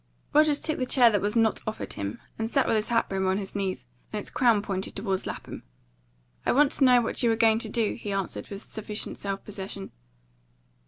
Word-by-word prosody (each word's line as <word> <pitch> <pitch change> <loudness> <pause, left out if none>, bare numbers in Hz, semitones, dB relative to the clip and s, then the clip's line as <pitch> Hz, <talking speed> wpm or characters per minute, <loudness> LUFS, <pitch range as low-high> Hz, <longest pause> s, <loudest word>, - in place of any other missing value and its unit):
Rogers 300 -1 +5
took 310 - -2
the 255 - -1
chair 245 -4 +5
that 205 -3 +1
was 205 +2 -1
not 225 -1 +3
offered 220 - -4
him, 100 +1 -4 0.2
and 225 0 -1
sat 270 +2 +2
with - - +2
his 215 -1 0
hat 235 -1 +2
brim 190 -1 -1
on 190 +1 +2
his 195 -2 -5
knees, 190 -11 -2 0.3
and 215 - -2
its - - -5
crown 230 -5 +3
pointed 190 -2 -3
towards 195 -2 -2
Lapham. - - -6 0.8
"I - - +2
want 280 +2 +5
to - - 0
know 250 -1 +6
what 230 - -1
you 235 -2 +3
are - - +2
going 225 -1 +4
to - - -3
do," 230 -3 0
he 205 - -6
answered 195 -2 -3
with 200 0 -6
sufficient 215 -1 -4
self 195 -1 -4
possession. 195 -1 -6
215 Hz, 220 wpm, -27 LUFS, 195-235 Hz, 0.8 s, know